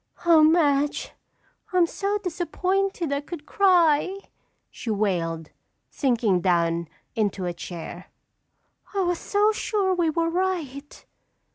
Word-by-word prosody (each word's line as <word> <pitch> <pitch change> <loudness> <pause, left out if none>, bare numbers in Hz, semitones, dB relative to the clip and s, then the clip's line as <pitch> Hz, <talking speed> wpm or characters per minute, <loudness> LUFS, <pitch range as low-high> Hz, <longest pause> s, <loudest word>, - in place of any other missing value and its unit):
"Oh, 330 -2 +6
Madge, 295 -3 +2 0.6
I'm 365 -2 +4
so 400 +4 -2
disappointed 365 -2 -1
I 280 - -1
could 300 0 -8
cry," 360 -2 +3 0.5
she 235 - -7
wailed, 170 -7 -1 0.4
sinking 230 - +1
down 170 -2 +1 0.3
into 205 -4 -1
a 175 - -2
chair. 175 +1 -8 0.9
"I 395 - +2
was 355 -2 0
so 415 +1 +2
sure 410 -3 0
we 345 -3 +1
were 330 +1 0
right." 330 -6 -3
315 Hz, 115 wpm, -25 LUFS, -, 0.9 s, Oh